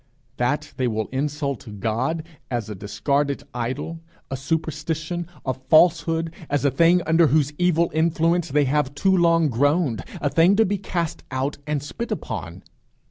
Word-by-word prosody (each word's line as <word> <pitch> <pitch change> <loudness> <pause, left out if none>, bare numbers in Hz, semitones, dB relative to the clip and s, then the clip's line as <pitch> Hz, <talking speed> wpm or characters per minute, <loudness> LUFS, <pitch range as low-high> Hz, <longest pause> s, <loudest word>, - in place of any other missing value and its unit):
That - - -1
they 130 - +1
will 110 -2 -2
insult 140 -6 -3
God 125 +10 -1 0.3
as 120 -4 -3
a - - -3
discarded 140 +8 -1
idol, 125 +7 -3 0.3
a - - -1
superstition, 160 +3 -3 0.2
a 130 - 0
falsehood, 165 +4 +3 0.2
as 145 0 0
a 140 - +4
thing 170 +6 +4
under 165 +1 +4
whose 150 -1 +2
evil 170 -1 +2
influence 165 +1 +1
they 145 +1 +3
have 140 0 0
too 190 +5 +3
long 165 -2 +4
groaned, 140 - +1 0.2
a 145 - -1
thing 170 +4 +5
to 220 +2 +4
be 200 +1 -1
cast 170 -4 -3
out 135 +2 -2
and 150 -2 -1
spit 235 +10 -5
upon. - - -5
150 Hz, 155 wpm, -23 LUFS, 135-165 Hz, 0.3 s, thing